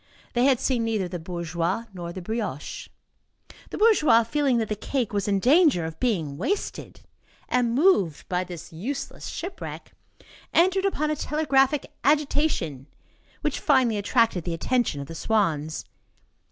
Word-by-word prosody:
They 245 +1 +3
had 265 -3 +4
seen 245 -3 0
neither 220 -5 -1
the 175 0 -5
bourgeois 170 +4 -2
nor 175 -2 -6
the 185 0 -7
brioche. 210 - -4 0.8
The - - -6
bourgeois, 355 - +5
feeling 270 +1 +1
that 225 -2 0
the 210 - -2
cake 235 +2 -2
was 200 -1 -1
in 200 -1 +2
danger 270 - +4
of 160 0 -7
being 165 - -1
wasted, 370 - -3 0.5
and 240 -2 +1
moved 250 - +3
by 180 0 0
this 175 -2 -9
useless 265 - -5
shipwreck, 365 +2 -7 0.6
entered 375 +3 +4
upon 305 -6 0
a - - 0
telegraphic 290 -2 +1 0.2
agitation, 280 - +1 0.5
which 300 -2 -1
finally 260 -7 +3
attracted 205 -3 +2
the 170 -1 -3
attention 235 - 0
of - - -6
the 165 - -8
swans. 160 -6 0
225 Hz, 145 wpm, -25 LUFS, 175-280 Hz, 0.8 s, bourgeois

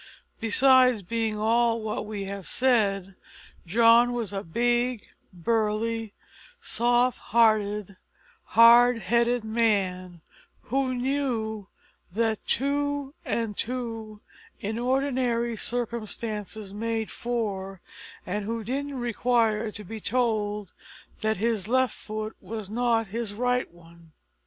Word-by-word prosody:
Besides 255 0 +4
being 220 +2 -2
all 230 +1 +2
that - - -2
we 210 -1 -5
have 195 -3 -6
said, 200 -7 +1 0.5
John 230 +4 +5
was 230 -4 -3
a 195 - -2
big, 240 +5 0 0.3
burly, 220 +3 -1 0.4
soft 245 +1 +1
hearted, 210 -3 +2 0.6
hard 240 +1 +8
headed 235 +1 +1
man, 195 -6 0 0.4
who 260 +1 -1
knew 245 -6 -2 0.4
that 220 +2 0
two 285 +1 0
and 230 -6 -2
two 225 -3 -4 0.4
in 220 +3 -3
ordinary 250 -2 0
circumstances 220 -3 -4
made 225 +1 -2
four, 200 -5 -3 0.5
and 200 +3 -3
who 225 +1 -3
didn't 275 +4 -3
require 230 -2 +1
to 210 - -8
be 220 +3 -7
told 210 -4 -1 0.5
that 220 -1 0
his 215 -1 0
left 260 +2 +2
foot 215 0 -6
was 215 -3 -6
not 230 -1 +1
his 220 -1 -4
right 250 +2 0
one. 170 -1 -18
225 Hz, 110 wpm, -26 LUFS, 210-240 Hz, 0.6 s, hard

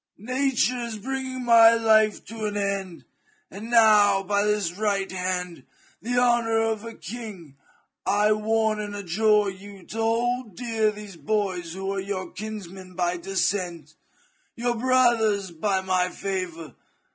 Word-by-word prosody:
Nature 255 +2 0
is 235 -2 -4
bringing 260 +2 -4
my 230 -1 +7
life 220 -2 +3
to 225 -1 -6
an 205 -1 -2
end, 195 -3 -3 0.5
and 210 +4 -8
now, 210 -4 +5
by 200 +1 +1
this 210 -4 0
right 195 0 -1
hand, 180 -1 -3 0.4
by 230 - -8
the 245 - 0
honour 235 -2 +3
of 225 -1 -1
a 230 -1 -8
king, 205 - -9 0.5
I 210 +1 +2
warn 215 0 +1
and 205 -1 -5
adjure 205 +2 +2
you 195 0 -12
to 225 - -8
hold 230 -1 0
dear 225 -3 0
these 210 -3 -9
boys 180 -1 -2
who 195 +1 -3
are 195 - -2
your 190 -1 -4
kinsmen 190 -3 -8
by 175 0 0
de 195 +3 -8
scent, 175 -6 -1 0.6
your 240 0 -1
brothers 230 -6 +2
by 190 +3 -1
my 185 -1 +1
favour. 180 -7 -5
210 Hz, 145 wpm, -25 LUFS, 190-225 Hz, 0.6 s, my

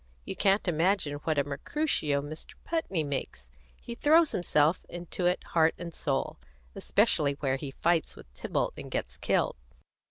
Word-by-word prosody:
You - - -4
can't 195 0 +2
imagine 175 -1 +2
what 155 -2 +1
a 145 - +4
Mercutio 145 - -1
Mr. 155 +2 -8
Putney 260 - -1
makes; 65 - -5 0.3
he 235 - -7
throws 310 +6 +4
himself 160 -2 +2
into 175 +1 -3
it 180 - +1
heart 160 -1 +4
and 170 -1 -7
soul, 135 -3 -2 0.3
especially 140 -2 +2
where 135 -1 -1
he 140 +1 -5
fights 165 +4 0
with - - -12
Tybalt - - -1
and - - -7
gets - - -3
killed. - - +1
160 Hz, 155 wpm, -29 LUFS, 145-185 Hz, 0.3 s, a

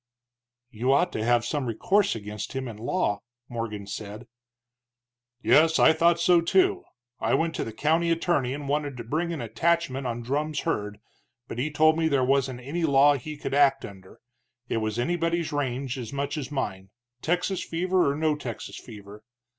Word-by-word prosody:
"You 125 +3 0
ought 175 +6 +2
to 110 - -3
have 120 0 +2
some 145 -4 -2
recourse 190 - +1
against 105 -1 -6
him 130 -1 -3
in 115 -3 -8
law," 115 - -1 0.3
Morgan 115 -4 -5
said. 105 +3 -7 1.2
"Yes, 160 +1 +5
I 160 - +6
thought 170 +1 +3
so, 170 0 +5
too. 375 - +2 0.3
I - - +1
went 165 0 0
to - - -1
the 115 - -5
county 160 +8 +1
attorney 165 -6 +1
and 145 -1 -7
wanted 145 -2 -1
to 120 - -6
bring 160 +9 -2
an 160 -5 -4
attachment 145 +1 0
on 120 0 -4
Drumm's 150 +5 -1
herd, 105 -11 -2 0.5
but 120 - -6
he 140 +5 0
told 155 +2 +3
me 160 - +2
there 140 -4 +2
wasn't 135 -2 +1
any 155 +7 -3
law 145 -1 +5
he 150 +3 -6
could 135 - -5
act 140 -1 +4
under, 95 -2 -13 0.5
it - - -1
was 110 0 -2
anybody's 170 +4 0
range 135 -2 -2
as 115 -3 -6
much 140 +1 -3
as 140 -5 -4
mine, 95 -9 -4 0.3
Texas 180 +3 0
fever 180 -2 +1
or - - -3
no 155 0 +1
Texas 125 -6 -7
fever. 105 -2 -12
140 Hz, 180 wpm, -26 LUFS, 120-165 Hz, 1.2 s, I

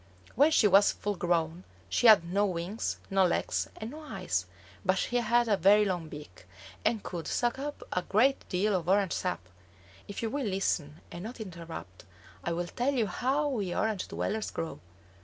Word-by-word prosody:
When 285 +6 +5
she 275 -9 +5
was 200 +1 +6
full 205 0 -3
grown 170 -1 0 0.2
she 240 - +3
had 210 -6 +8
no 195 +4 +1
wings, 180 +4 -3
no 195 0 +4
legs, 180 - 0
and 220 +2 -6
no 305 - -8
eyes, 90 - -3 0.4
but 185 0 +2
she 245 - 0
had 240 0 +2
a 210 - +4
very 200 +3 +5
long 175 -5 -2
beak, 145 -13 -11 0.4
and 220 -1 +1
could 170 -4 -5
suck 240 +1 0
up 290 +1 -5
a 180 - +1
great 230 +9 +2
deal 200 +3 +1
of 175 -1 -2
orange 195 -2 +3
sap. 180 - -2 0.7
If 200 +2 -6
you 225 - -1
will 280 -3 -1
listen 170 -6 -1
and 175 - -7
not 235 +4 -7
interrupt, 170 - -8 0.4
I 170 - -1
will 175 +1 -1
tell 250 +9 -1
you 235 -4 +2
how 265 +9 0
we 205 -9 -2
Orange 215 -3 -1
dwellers 215 +1 -2
grow. 165 - -5
200 Hz, 185 wpm, -30 LUFS, 175-230 Hz, 0.7 s, had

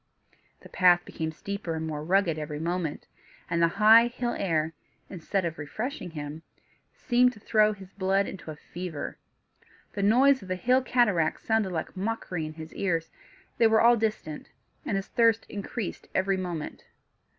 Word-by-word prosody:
The - - -14
path 175 -1 +4
became 160 -1 -4
steeper 190 0 -5
and 160 0 -3
more 150 -1 -4
rugged 175 -2 +2
every 150 -1 -5
moment; 170 -1 -2 0.5
and 170 - +1
the 170 - +6
high 225 +2 +8
hill 240 0 -3
air, 160 -4 0 0.4
instead 185 +1 -2
of 165 -1 -4
refreshing 215 - -5
him, 150 -1 -7 0.5
seemed 250 +1 +3
to 215 - -15
throw 215 0 +3
his 195 -2 -13
blood 195 0 +1
into 190 - -8
a 155 - -6
fever. 170 0 -7 0.7
The 200 - -3
noise 260 +7 +5
of 190 - -11
the 185 - -1
hill 250 +8 +3
cataracts 210 -11 +1
sounded 220 -4 +1
like 160 -2 -4
mockery 185 -5 -3
in 155 - -8
his 160 0 -10
ears; 165 -4 -1 0.5
they 230 - +6
were 220 0 +4
all 240 +1 +6
distant, 215 -9 -3 0.4
and 195 - 0
his 195 - -3
thirst 230 -1 +3
increased 205 +1 -5
every 190 +1 +2
moment. 175 -5 -5
190 Hz, 165 wpm, -27 LUFS, 165-220 Hz, 0.7 s, high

